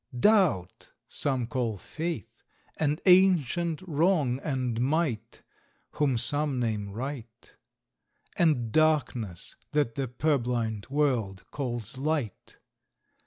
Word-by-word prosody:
Doubt, 180 Hz, -, +2 dB
some 130 Hz, -4 st, -1 dB
call 115 Hz, -3 st, -2 dB
Faith; 160 Hz, -, -5 dB, 0.4 s
and 150 Hz, 0 st, 0 dB
ancient 175 Hz, -3 st, +4 dB
Wrong 155 Hz, -6 st, +1 dB
and 130 Hz, -6 st, -2 dB
Might, 140 Hz, -3 st, -1 dB, 0.5 s
Whom 140 Hz, -5 st, +1 dB
some 145 Hz, +3 st, +1 dB
name 110 Hz, -4 st, -1 dB
Right; 120 Hz, +1 st, -7 dB, 0.8 s
And 140 Hz, -10 st, +2 dB
Darkness, 130 Hz, -, 0 dB, 0.2 s
that 145 Hz, -6 st, +1 dB
the 135 Hz, 0 st, -2 dB
purblind 120 Hz, -5 st, -1 dB
world 125 Hz, -10 st, 0 dB
calls 120 Hz, -3 st, -4 dB
Light. 145 Hz, -, -3 dB
135 Hz, 95 wpm, -28 LUFS, 115-155 Hz, 0.8 s, ancient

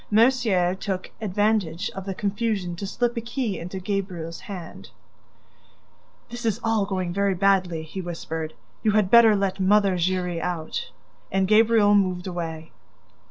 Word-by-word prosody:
Mercier 220 Hz, -6 st, +3 dB
took 190 Hz, -1 st, -4 dB
advantage 205 Hz, -4 st, 0 dB
of 195 Hz, -1 st, -7 dB
the 195 Hz, -, -3 dB
confusion 205 Hz, -3 st, -1 dB
to 195 Hz, +3 st, -5 dB
slip 240 Hz, +4 st, -1 dB
a -, -, 0 dB
key 235 Hz, -5 st, -3 dB
into 180 Hz, +3 st, -6 dB
Gabriel's 185 Hz, -4 st, -4 dB
hand: 180 Hz, -5 st, -9 dB, 1.4 s
"This 240 Hz, +1 st, -6 dB
is 225 Hz, -4 st, 0 dB
all 225 Hz, -3 st, +1 dB
going 185 Hz, -3 st, -2 dB
very 200 Hz, 0 st, +1 dB
badly," 185 Hz, -4 st, +2 dB
he 175 Hz, +5 st, -6 dB
whispered. 160 Hz, -3 st, -5 dB, 0.3 s
"You 215 Hz, -, +2 dB
had 210 Hz, -3 st, +2 dB
better 230 Hz, -2 st, +8 dB
let 195 Hz, -1 st, -1 dB
Mother 195 Hz, 0 st, +3 dB
Giry 180 Hz, -1 st, 0 dB
out." 180 Hz, -, -3 dB, 0.4 s
And 190 Hz, 0 st, +1 dB
Gabriel 215 Hz, 0 st, +5 dB
moved 185 Hz, -3 st, +2 dB
away. 165 Hz, -3 st, -5 dB
195 Hz, 145 wpm, -24 LUFS, 180-215 Hz, 1.4 s, better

